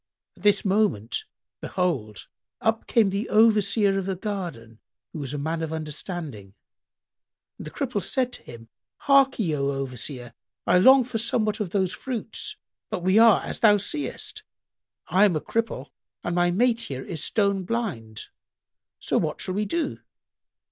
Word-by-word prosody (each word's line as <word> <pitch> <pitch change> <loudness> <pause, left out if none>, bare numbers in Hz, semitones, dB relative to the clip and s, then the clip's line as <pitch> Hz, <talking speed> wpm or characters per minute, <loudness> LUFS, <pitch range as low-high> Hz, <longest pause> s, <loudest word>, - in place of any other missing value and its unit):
At - - -19
this 205 0 +3
moment, 190 - +1 0.4
behold, 135 - -2 0.3
up 225 0 0
came 215 -4 +3
the 200 +4 -2
Overseer 210 -2 +4
of 190 - -4
the 190 - -1
garden, 175 - -6 0.3
who 160 - -5
was 135 -3 -4
a 145 - -3
man 160 +3 -2
of 160 -1 -3
understanding, 155 - -6 1.0
and - - -7
the - - -5
Cripple 250 - -2
said 250 +6 -1
to - - -6
him, 115 -1 -12 0.3
"Harkye, 270 - +3
O 140 -1 0
Overseer! 125 -2 -5 0.3
I 180 - +4
long 260 +6 +7
for 240 -2 -4
somewhat 215 -2 0
of 205 -4 -2
those 190 -1 0
fruits; 235 -4 -4 0.3
but 175 - -4
we 185 +4 +4
are 230 -2 +6
as - - -5
thou 210 -2 +6
seest; 290 +10 -4 0.6
I 195 +3 +4
am 190 -5 +2
a - - +1
cripple 225 - -3 0.3
and 175 - -2
my 175 0 +3
mate 235 +5 +2
here 135 - -4
is 160 -3 -4
stone 200 -3 +1
blind: 175 - -4 0.7
so - - 0
what - - -2
shall 185 - -3
we 210 +2 0
do?" 325 +11 -2
190 Hz, 160 wpm, -25 LUFS, 150-220 Hz, 1.0 s, long